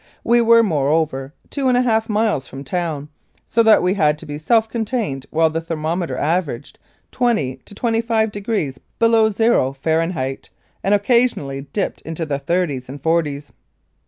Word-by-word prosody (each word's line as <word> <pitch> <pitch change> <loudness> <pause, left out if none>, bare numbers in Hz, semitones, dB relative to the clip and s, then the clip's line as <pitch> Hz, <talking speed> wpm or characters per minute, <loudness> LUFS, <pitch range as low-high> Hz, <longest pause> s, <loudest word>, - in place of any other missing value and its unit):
We 235 0 +4
were, 230 0 +6
moreover, 145 -5 0 0.2
two 275 -2 -1
and 250 -1 +3
a 250 - +3
half 225 -2 +1
miles 210 - 0
from 135 +1 -8
town, 155 -1 -3 0.4
so 230 - +2
that 220 -4 +5
we 180 +1 +2
had 150 -6 +2
to 160 - -10
be 145 -1 -6
self 225 +8 +2
contained 220 - -3
while 160 0 +2
the 165 +1 -2
thermometer 165 -2 -3
averaged 150 -4 -2 0.3
20 215 - 0
to 170 +10 -14
25 225 -1 0 0.7
below 230 -1 +4
zero, 215 - +2
Fahren 160 +5 0
heit, 135 -3 -4 0.3
and 200 +1 +3
occasionally 205 - +1
dipped 200 - -2
into 165 0 -5
the 140 -2 -2
thirties 140 -4 -1
and 140 +2 -7
forties. 150 -3 0
165 Hz, 160 wpm, -20 LUFS, 145-225 Hz, 0.7 s, were